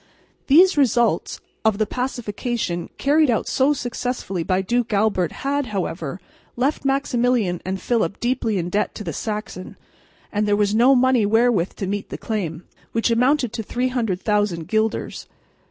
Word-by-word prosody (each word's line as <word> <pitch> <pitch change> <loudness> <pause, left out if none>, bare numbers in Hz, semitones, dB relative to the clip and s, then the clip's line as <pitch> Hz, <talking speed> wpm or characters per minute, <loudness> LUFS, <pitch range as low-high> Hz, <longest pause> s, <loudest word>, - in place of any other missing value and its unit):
These 345 +5 +6
results 240 -3 +2 0.2
of 220 -2 +2
the 215 - +1
pacification 235 -6 -3
carried 295 +1 +3
out 230 - +1
so 270 +2 +2
successfully 245 -8 -3
by 185 +3 0
Duke 235 +3 0
Albert 200 -4 +1
had, 285 -1 0
however, 175 -5 -4 0.4
left 265 +5 0
Maximilian 245 -8 +1
and 190 +1 -3
Philip 215 -6 -1
deeply 240 -4 0
in 175 -1 -2
debt 205 - 0
to 215 - -6
the - - -4
Saxon; 210 -4 -5 0.6
and 210 0 0
there 205 - +3
was 205 0 +1
no 245 +5 +5
money 255 -4 +3
wherewith 225 -4 +2
to 195 - -4
meet 200 +1 -3
the - - -5
claim, 180 -7 -4 0.3
which 230 +1 +1
amounted 250 0 +2
to 230 - -3
300,000 210 -7 -1
guilders. 220 0 -1
225 Hz, 150 wpm, -22 LUFS, 200-250 Hz, 0.6 s, These